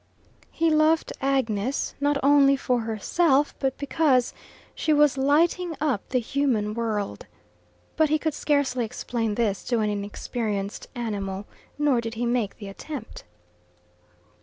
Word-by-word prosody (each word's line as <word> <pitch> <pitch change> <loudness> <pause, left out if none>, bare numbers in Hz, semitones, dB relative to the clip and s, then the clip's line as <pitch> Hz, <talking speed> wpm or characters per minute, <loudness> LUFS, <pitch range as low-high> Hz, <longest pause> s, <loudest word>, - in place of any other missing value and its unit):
He 330 0 +1
loved 310 +1 +3
Agnes, 260 -3 0
not 290 0 +2
only 280 0 +6
for 250 -2 0
herself, 265 - +1
but 265 -1 -1
because 280 -3 +2 0.4
she 315 - -1
was 295 -2 +4
lighting 320 +4 +2
up 275 -9 -1
the 255 - +1
human 240 -4 0
world. 215 -3 -3 0.7
But 315 -1 +4
he 310 - +3
could 315 0 -2
scarcely 280 -5 +1
explain 225 -1 -3
this 210 -4 0
to 240 - 0
an 215 -1 +1
inexperienced 205 0 -4
animal, 200 -4 -3 0.3
nor 290 -5 +2
did 225 0 -5
he 240 +2 -2
make 235 -4 -1
the 205 - -8
attempt. 305 - -8
255 Hz, 135 wpm, -25 LUFS, 220-290 Hz, 0.7 s, only